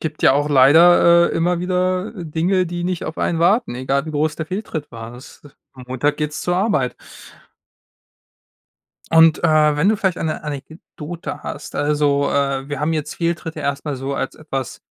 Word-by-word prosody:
gibt 155 -1 -5
ja - - +6
auch 145 +2 +1
leider, 170 +5 +6
äh, - - -5
immer 170 +1 0
wieder 185 +2 -1
Dinge, 175 +2 0
die 175 0 -4
nicht 180 -1 -2
auf 155 - -6
einen 165 - 0
warten, 195 - +2
egal 135 +3 -1
wie - - -4
groß 150 0 -1
der 160 - -4
Fehltritt 180 -6 -5
war. 115 0 -9
Das 125 +2 -14 0.3
am 130 -2 -12
Montag 130 +3 0
geht's 150 -1 -3
zur 175 0 -1
Arbeit. 155 - 0 2.2
Und, 165 -1 +5
äh, 155 -2 +4
wenn 155 +7 +2
du 215 - +3
vielleicht 190 -3 -1
eine 155 -1 -3
Anekdote 155 +3 -8
hast - - -7
also 145 -1 +1
äh, 140 -1 -1
wir 145 -1 -4
haben 150 +2 0
jetzt 155 -1 -3
Fehltritte 165 -2 -3
erst 140 0 -3
mal 145 - -3
so 135 +1 -4
als 135 - -3
etwas 135 -4 -6
155 Hz, 175 wpm, -20 LUFS, 140-170 Hz, 2.2 s, ja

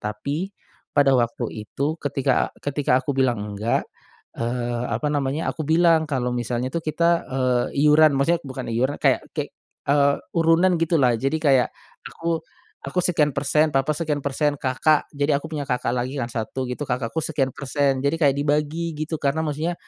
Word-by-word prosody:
Tapi 140 - -3 0.5
pada 140 -1 +5
waktu 120 -1 +1
itu, 140 +9 -3
ketika 135 -2 +1 0.2
ketika 145 -2 +1
aku 145 - 0
bilang 130 -3 +2
"Enggak." 105 +2 -1 0.5
Eee, 120 0 -2
apa 115 +6 -1
namanya, 145 +2 -1
aku 155 -2 -5
bilang 165 -1 +4
kalau 125 -4 -1
misalnya 120 +1 -2
tuh 170 - -1
kita, 170 +2 +1
eee, 130 -2 +1 0.2
iuran 150 -1 +6
maksudnya 165 +5 +2
bukan 130 -3 -7
iuran 130 +5 0
kayak - - +3 0.2
kek - - -3 0.4
eee, 140 0 +4 0.2
urunan, 165 +3 +4
gitulah. 155 -7 +3
Jadi 135 +6 0
kayak, 135 -4 +4 0.4
aku 165 -1 -2 0.5
aku 180 - 0
sekian 150 -5 +2
persen, 150 +2 +1
papa 135 +2 +2
sekian 150 -3 -1
persen, 145 +1 0
kakak 145 +3 +1
jadi 145 0 0
aku 160 - -8
punya 150 -3 -4
kakak 125 -2 -1
lagi 125 +2 -2
kan 120 - -4
1 125 +3 -4
gitu, 145 +4 -4
kakakku 125 +3 -2
sekian 145 -4 0
persen. 140 0 0
Jadi 140 +3 0
kayak 140 -3 +4
dibagi 150 +3 0
gitu 155 +1 -3
karena 145 +3 0
maksudnya, 160 +3 -2
140 Hz, 165 wpm, -23 LUFS, 130-155 Hz, 0.5 s, iuran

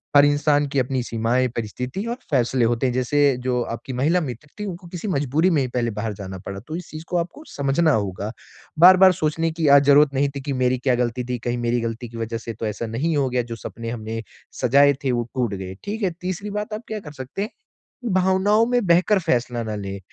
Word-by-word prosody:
हर 145 0 +8
इंसान 145 0 +2
की 140 - 0
अपनी 130 0 0
सीमाएँ, 120 +2 +1
परिस्थिति 125 - -4
और 235 - -2 0.2
फ़ैसले 125 -2 +2
होते 120 +2 +1
हैं, 125 - -1
जैसे 135 +1 +2
जो 125 -1 0
आपकी 120 +3 -8
महिला 155 +8 +2
मित्र 135 +1 -6
थी, 210 - -3
उनको 180 -2 -7
किसी 175 +4 -6
मजबूरी 150 +3 +2
में 150 -5 +3
ही 130 - 0
पहले 120 -2 -1
बाहर 105 +1 -3
जाना 95 -1 -7
पड़ा 100 0 -5
तो 155 - -5
इस 180 - -9
चीज़ 155 +1 -8
को 180 - 0
आपको 175 - -5
समझना 140 +3 +2
होगा। 100 0 -2 0.5
बार-बार 185 +1 +8
सोचने 160 +2 +1
की 160 -1 -1
आज 140 - +4
ज़रूरत 145 0 +6
नहीं 140 +1 +2
थी 140 - -4
कि 140 0 -3
मेरी 125 0 +2
क्या 125 -1 +2
गलती 120 +1 -1
थी, 125 0 -2
कहीं 120 +1 -2
मेरी 120 0 0
गलती 115 +1 -4
की 115 - -9
वजह 115 0 -3
से 115 0 -6
तो 110 - -5
ऐसा 105 +2 -3
नहीं 145 +9 -1
हो 135 -2 +1
गया, 125 0 +1
जो 115 -1 -6
सपने 115 0 -7
हमने 115 -1 -4 0.4
सजाए 140 +3 +5
थे 130 - +2
वो 120 -1 0
टूट 120 -5 0
गए, 95 0 -6
ठीक 215 +2 -4
है? 185 - +2
तीसरी 185 +3 -4
बात 210 0 -7
आप 220 +3 -5
क्या 215 -1 -4
कर 150 -6 -10
सकते 135 +7 -6
हैं? 215 - -4 0.6
भावनाओं 190 +4 +3
में 245 -4 +1
बहकर 180 +4 +4
फ़ैसला 120 -6 0
ना 110 -1 -4
लें। 100 -1 -5
130 Hz, 235 wpm, -22 LUFS, 120-165 Hz, 0.6 s, हर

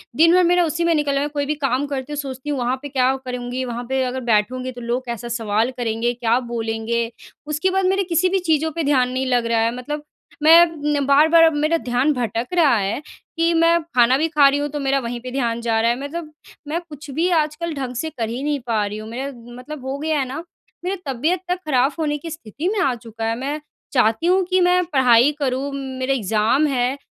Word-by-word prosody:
दिन 330 +3 +5
भर 365 - +5
मेरा 355 +1 +4
उसी 325 +2 -1
में 335 - +3
निकलना 280 -2 +1
है। 290 - 0
कोई 290 -1 -2
भी 300 +2 -1
काम 275 -1 0
करती 275 0 -4
हूँ - - -4
सोचती 270 0 -5
हूँ 285 -3 -1
वहाँ 245 +1 0
पे 285 - -7
क्या 260 0 +2
करूँगी? 250 0 -4
वहाँ 240 0 -4
पे 265 0 +1
अगर 255 +1 -3
बैठूँगी 245 +3 0
तो 245 -1 -10
लोग 245 +2 -2
कैसा 235 0 -5
सवाल 225 +1 0
करेंगे? 235 0 -1
क्या 240 0 +1
बोलेंगे? 230 -1 -2 0.4
उसके 305 +5 0
बाद 385 0 +1
मेरे 385 +1 +2
किसी 350 +1 +1
भी 385 +1 +1
चीज़ों 320 0 +2
पे 330 - -1
ध्यान 260 -3 +2
नहीं 260 +1 -2
लग 245 -2 +1
रहा 230 -1 +1
है 230 +1 +1
मतलब 295 +4 -5 0.4
मैं 335 +2 +8 0.3
न 275 - -1
बार-बार 315 +4 +5
अब 320 -1 +5
मेरा 310 +3 +2
ध्यान 250 +4 +2
भटक 240 -2 -2
रहा 315 -8 +4
है 200 +6 -2 0.4
कि 335 +1 +2
मैं 335 +1 +4
खाना 255 -5 +3
भी 315 +3 +1
खा 300 -3 +5
रही 280 +1 +2
हूँ, 290 - -2
तो 295 +1 -4
मेरा 275 0 +1
वहीं 240 -1 -4
पे 255 0 -7
ध्यान 235 -3 -1
जा 225 -1 +1
रहा 230 - +3
है। 240 - -3
मतलब 305 +2 -6 0.4
मैं 320 +3 -1
कुछ 295 0 -10
भी 330 +6 +1
आजकल 305 +2 -2
ढँग 260 -3 -4
से 315 +7 -2
कर 235 -7 -4
ही 240 +3 -4
नहीं 295 -1 0
पा 220 -3 +1
रही 205 +1 -5
हूँ। 215 +1 -8
मेरा 265 +4 -4 0.2
मतलब 260 +2 -9
हो 265 +1 -3
गया 310 -1 0
है 270 - 0
ना 305 +6 -6 0.4
मेरी 375 +2 -1
तबियत 295 +7 0
तक 360 - +1
ख़राब 265 -1 +3
होने 295 -2 0
की 330 +3 -8
स्थिति 300 - -5
में 420 0 -1
आ 270 -6 +2
चुका 225 -1 -7
है। 225 0 0
मैं 290 +3 -3 0.3
चाहती 245 +5 +2
हूँ 375 +1 +4
कि 370 0 +3
मैं 360 0 +4
पढ़ाई 255 0 +5
करूँ 270 +1 -1
मेरे 265 -1 -2
एग्ज़ाम 225 +6 +2
हैं, 260 -1 0
270 Hz, 235 wpm, -21 LUFS, 240-305 Hz, 0.4 s, मैं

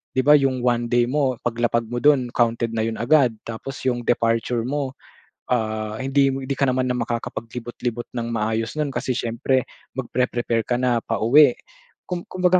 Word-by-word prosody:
'di 130 - +2
ba 145 - +5
yung 130 -2 0
1 120 -1 +1
day 120 0 +3
mo 130 +1 +1
paglapag 120 0 0
mo 120 - -1
do'n 130 -3 +3
counted 115 -1 +1
na 110 0 -1
yun 115 - -3
agad 125 0 +3
tapos 115 +4 -6
yung 125 -2 +1
departure 115 0 +1
mo, 135 +1 -3 0.6
ah, 110 -2 -1
hindi 135 +1 +2
hindi 135 0 -3
ka 140 - -1
naman 130 0 0
makakapaglibot-libot 120 0 -4
ng 120 -1 -3
maayos 115 +4 -1
no'n 150 - +1
kasi - - -1
siyempre 125 +1 0 0.2
mag-pre-prepare 120 -2 -1
ka 120 +1 -1
na 125 -2 +1
pauwi. 120 +6 +5 0.6
Kum-kumbaga 180 0 +1
120 Hz, 155 wpm, -22 LUFS, 115-130 Hz, 0.6 s, ba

